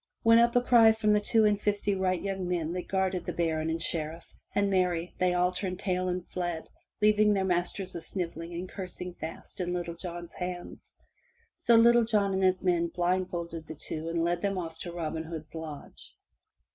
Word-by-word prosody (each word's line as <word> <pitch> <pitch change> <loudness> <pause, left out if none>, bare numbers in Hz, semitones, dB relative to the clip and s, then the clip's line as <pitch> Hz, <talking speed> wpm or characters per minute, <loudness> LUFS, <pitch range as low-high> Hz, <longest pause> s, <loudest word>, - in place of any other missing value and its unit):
Went 230 0 +7
up 235 0 +3
a 245 - +5
cry 235 -3 +6
from 220 -1 +2
the 210 - +4
two 220 +1 +3
and 205 -1 +2
fifty 205 0 0
wight 185 -2 0
young 195 -2 -2
men 170 -2 -1
that 180 0 -4
guarded 190 -2 0
the - - -3
baron 160 -2 0
and 165 +1 -1
sheriff, 165 0 -3 0.2
and 200 0 +3
marry! 180 -3 0
they 180 -1 +2
all 180 0 +3
turned 185 0 -3
tail 185 -1 0
and 180 0 -3
fled, 175 -3 -3 0.4
leaving 210 0 +5
their 190 -1 +1
masters 180 +1 -1
a 170 - -5
snivelling 170 -2 -4
and 180 +2 -4
cursing 180 -1 -5
fast 165 +3 -7
in 175 0 -1
Little 175 -1 -3
John's 175 0 -7
hands. 180 -1 -7 0.6
So 235 - +3
Little 235 +1 +6
John 210 -3 +1
and 190 - 0
his 185 0 +2
men 175 -2 +2
blindfolded 175 -2 -2
the 160 - -7
two 155 +2 -5
and 165 0 0
led 175 0 0
them 200 -1 0
off 165 -2 -5
to 175 - -5
Robin 165 -2 -3
Hood's 160 -1 -8
lodge. 160 -3 -9
180 Hz, 195 wpm, -29 LUFS, 170-195 Hz, 0.6 s, Went